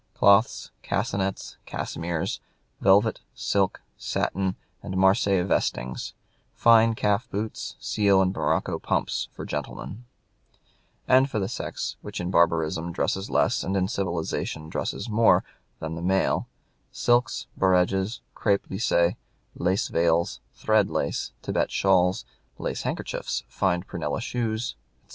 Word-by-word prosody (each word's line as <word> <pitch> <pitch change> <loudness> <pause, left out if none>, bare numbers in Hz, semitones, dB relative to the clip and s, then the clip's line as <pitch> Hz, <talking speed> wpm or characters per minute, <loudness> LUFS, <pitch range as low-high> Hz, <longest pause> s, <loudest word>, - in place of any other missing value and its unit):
"Cloths, 100 +3 +4
cassinetts, 100 -1 -2
cassimeres, 85 -1 -3 0.4
velvet, 100 +3 +4 0.2
silk, 100 -2 0
satin, 95 0 -1 0.3
and 95 -2 -4
Marseilles 95 -1 +3
vestings, 65 -9 -1 0.4
fine 115 -1 +5
calf 105 +2 0
boots, 105 +2 -4
seal 100 -2 +3
and 95 -1 +2
morocco - - 0
pumps, - - -1
for - - -8
gentlemen," 95 - -5 1.0
and 130 +2 +5
for 110 - -3
the 95 -2 0
sex - - -4
which - - -6
in 90 +1 -3
barbarism 85 -1 +2
dresses 95 +3 -1
less - - +2
and 95 +1 -1
in 95 -1 +1
civilization 85 -4 -3
dresses - - -3
more 110 +1 +4 0.4
than 80 0 -4
the 80 - -5
male, 95 +2 +1 0.4
"silks, 120 -2 +1
bareges, 95 +3 +2
crepe 100 -2 +1
lisse, 95 -4 +2 0.4
lace 95 +3 0
veils, 85 0 +1 0.2
thread 110 -2 +2
lace, - - -2
Thibet - - 0
shawls, 95 -1 +2 0.3
lace - - -3
handkerchiefs, - - -3
fine 90 -2 0
prunella 85 -3 -3
shoes, 115 -1 -2 0.3
etc." - - -36
95 Hz, 120 wpm, -26 LUFS, 85-105 Hz, 1.0 s, fine